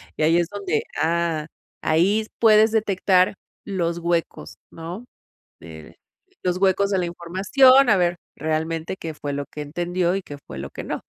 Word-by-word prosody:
Y - - -1
ahí 165 +2 +4
es 175 - +1
donde, 200 -7 -2 0.2
ah, 165 -1 0 0.3
ahí 180 +7 +2
s 215 - -10
puedes 220 -1 +5
detectar 195 -4 +2 0.3
los 170 -4 -2
huecos, 170 -1 -2 0.2
¿no?, 170 +8 -8 0.5
de 80 -2 -12 0.5
los 180 -1 0
huecos 195 +1 +2
de 195 - +1
la 180 - 0
información, 200 +11 +4
a 210 - +5
ver 175 -1 +1 0.2
realmente 160 +2 -2
qué 165 -4 -6
fue 145 -1 -5
lo 140 0 -3
que 150 - -9
entendió 175 +4 -1
y 195 - -2
qué 145 -5 -10
fue - - -8
lo 70 +1 -6
que - - -8
no. - - -4
175 Hz, 170 wpm, -23 LUFS, 160-195 Hz, 0.5 s, puedes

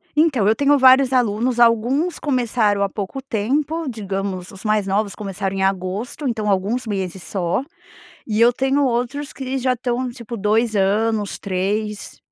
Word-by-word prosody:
Então, 285 -10 +3
eu 220 - +4
tenho 285 +2 +3
vários 260 0 +6
alunos, 240 0 +1
alguns 240 +9 +2
começaram 235 -7 +1
há 200 - 0
pouco 205 +7 -5
tempo, 280 +7 -1
digamos 195 -4 -4
os 195 +1 -13
mais 215 -2 +2
novos 200 +1 -1
começaram 195 -2 -4
em 190 - -1
agosto, 195 +9 -2
então, 215 -3 -1
alguns 205 +6 0
meses 190 -3 -4
só, 180 +5 -1 0.6
e 215 -1 -1
eu 235 +1 +6
tenho 270 +2 +1
outros 255 +4 -2
que 265 0 -4
já 255 0 +1
estão 250 +1 -2
tipo 235 -1 -8
2 215 +2 +1
anos, 205 +1 +1
3 200 +3 -3
225 Hz, 155 wpm, -20 LUFS, 200-255 Hz, 0.6 s, vários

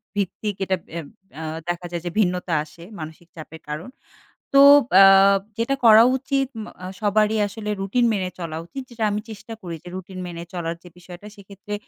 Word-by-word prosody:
ভিত্তিক 205 +1 -2
এটা 190 - +1 0.2
এম 150 - -8 0.3
এ্যা 160 - -7 0.3
দেখা 175 0 -3
যায়। 170 -1 -4
যে - - -1
ভিন্নতা 180 -3 0
আসে 155 +2 -15 0.2
মানসিক 160 +2 -9
চাপের 160 0 -11
কারণ। 155 +10 -5 0.6
তো 275 - +7 0.4
আ - - +10 0.5
যেটা 235 +4 0
করা 220 0 +9
উচিত 270 0 -1 0.2
মা - - -9
আ - - -5
সবারই 215 +1 +2
আসলে 210 +1 -7
রুটিন 220 +5 +1
মেনে 190 -3 -2
চলা 165 -2 -5
উচিত। 270 +10 -7
যেটা 230 -2 -5
আমি 210 +1 -2
চেষ্টা 220 +1 -9
করি 175 -3 -6
যে - - -13
রুটিন 185 0 -8
মেনে 170 -1 -7
চলার 170 -1 -3
যে 175 - -13
বিষয়টা। 180 +2 -12
সেক্ষেত্রে 200 +1 -10
190 Hz, 180 wpm, -22 LUFS, 170-215 Hz, 0.6 s, আ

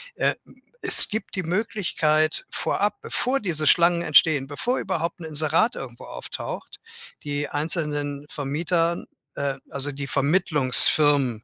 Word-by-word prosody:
Äh, - - 0
hm, - - -22 0.2
es - - +7
gibt 215 -1 -6
die 185 - -2
Möglichkeit 165 -5 -1
vorab, 205 +1 -2
bevor 260 +2 -2
diese 165 - -2
Schlangen 170 0 +3
entstehen, 150 -3 +3
bevor 235 - -3
überhaupt 170 -2 -4
'n - - -7
Inserat 155 +9 +1
irgendwo 120 -3 -9
auftaucht, - - -8 0.4
die 145 0 -3
einzelnen 145 -2 -3
Vermietern, 165 +4 -2 0.3
äh 140 -1 -3 0.2
also, 140 +1 -2
die 140 0 -6
Vermittlungsfirmen 140 - +3
155 Hz, 125 wpm, -23 LUFS, 145-175 Hz, 0.4 s, es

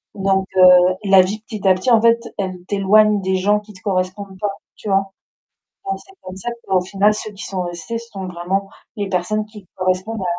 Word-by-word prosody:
Donc, 195 -1 +1
heu, 180 0 +7
la 195 -1 +6
vie 205 +4 -2
petit 210 -3 -5
à 190 - +7
petit 185 +7 0
en 225 -2 +6
fait, 230 0 +4 0.2
elle 185 -2 -4
t'éloigne 205 +1 +3
des 190 0 0
gens 205 +3 +2
qui 210 0 -15
te 185 - -16
correspondent 190 0 -2
pas, 205 -1 -2 0.2
tu 210 - -7
vois? 195 0 +1 0.8
Donc, 390 - -1
c'est 385 - -19
comme 185 - -8
ça 215 +5 -4
qu'au 190 -1 +2
final, 195 +3 +2
ceux 215 - -6
qui 195 -2 -9
sont 185 0 -4
restés, 175 +5 -5
ce 230 0 -11
sont 195 -1 -6
vraiment 180 +2 -2 0.3
les 205 -2 -3
personnes 195 +4 -1
qui 210 -2 -13
correspondent 185 +3 -1
à - - -2
195 Hz, 215 wpm, -19 LUFS, 185-210 Hz, 0.8 s, heu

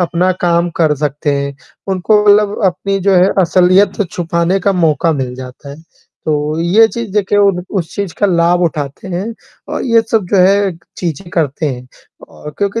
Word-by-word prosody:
अपना 180 +1 +1
काम 170 0 +1
कर 155 -3 +2
सकते 145 0 -2
हैं, 140 0 -3 0.3
उनको 195 +3 +2
मतलब 205 +1 +3
अपनी 195 +2 0
जो 195 0 +2
है, 180 +2 +5
असलियत 185 +4 +3
छुपाने 170 +2 -1
का 200 - +1
मौका 165 -3 +1
मिल 130 -4 -3
जाता 130 +2 -10
है। 140 - -9 0.5
तो 150 +1 -1
ये 195 +7 +4
चीज़ 235 -3 -6
देखिए 205 0 +1
उन 195 -3 +2 0.2
उस 165 -1 -5
चीज़ 200 -4 -3
का 205 - +3
लाभ 175 -1 +2
उठाते 150 +1 -3
हैं 185 +2 -3 0.5
अ, - - -1
ये 230 -3 +4
सब 220 -4 +1
जो 205 - +2
है, 195 +1 +3 0.2
चीज़ें 175 +1 -4
करते 155 -2 -1
हैं 125 -3 -5 0.4
और 150 - -10
क्योंकि 200 +3 -1
180 Hz, 180 wpm, -14 LUFS, 155-200 Hz, 0.5 s, है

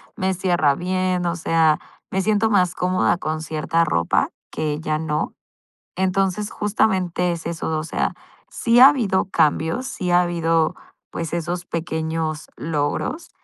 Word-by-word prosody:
me 190 +1 0
cierra 170 -6 +2
bien, 185 +1 -1
o 170 0 0
sea, 160 -2 +2 0.3
me 190 - +1
siento 215 +2 +2
más 180 -3 +3
cómoda 180 -1 +1
con 155 -2 -3
cierta 160 +1 0
ropa 85 - +1 0.2
que 150 -1 -2
ya 155 -1 -1
no. 155 -1 -2 0.6
Entonces, 190 +2 0
justamente 185 -4 0
es 170 -1 -6
eso, 165 -1 -3
o 155 - -3
sea, 165 - -1 0.3
sí 235 +1 +2
ha 265 - +11
habido 220 -11 +1
cambios, 160 - +1
sí 180 -8 -3
ha 175 0 +5
habido, 165 -2 +1 0.4
pues, 165 -1 -5
esos 170 +1 -3
pequeños 160 -1 -3
logros, 155 - -2
175 Hz, 145 wpm, -22 LUFS, 160-185 Hz, 0.6 s, ha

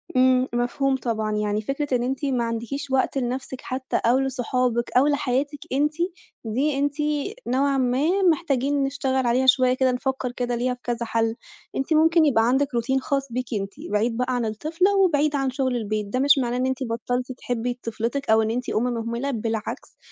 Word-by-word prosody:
امم، 255 0 +4
مفهوم 265 +3 +1
طبعًا، 220 -4 -2
يعني 210 0 0
فكرة 275 +2 -1
إن 240 - -2
أنتِ 265 +3 -2
ما 255 -4 0
عندكيش 235 +5 -4
وقت 265 +1 +1
لنفْسِك 255 +1 -3
حتى 260 0 -4
أو 245 +3 +4
لصحابِك 250 -2 0
أو 275 +3 +5
لحياتِك 285 0 0
أنتِ، 295 +2 +2 0.5
دي 270 +6 0
أنتِ 285 0 0 0.5
نوعًا 275 +2 +2
ما 275 +10 +1
محتاجين 285 -3 0
نشتغل 265 -1 0
عليها 250 +2 +2
شوية 255 -1 +5
كده، 260 0 +2
نفكر 260 0 -2
كده 245 -1 -2
ليها 250 +1 0
في 250 - -11
كذا 235 -1 -2
حل. 225 0 0 0.4
أنتِ 270 +4 0
ممكن 325 +1 +5
يبقى 230 -6 +3
عندِك 270 +3 +2
Routine 265 +3 +1
خاص 275 0 -1
بيكِ 250 +1 -3
أنتِ، 200 -2 -2 0.2
بعيد 225 +3 +1
بقى 250 0 0
عن 240 -2 0
الطفلة 325 - 0
وبعيد 300 -6 +3
عن 270 -1 +1
شغل 260 -1 -1
البيت، 215 -2 -2
ده 255 +5 -2
مش 285 +1 +5
معناه 245 -1 0
إن 255 - 0
أنتِ 260 0 -1
بطلتِ 245 +2 -2
تحبّي 245 0 -3
طفلتِك 230 +4 -3
أو 220 0 +5
إن 220 0 0
أنتِ 250 +2 -3
أم 220 - +1
مهملة، 235 +2 -2
بالعكس 225 -2 -4
255 Hz, 185 wpm, -24 LUFS, 235-275 Hz, 0.5 s, أو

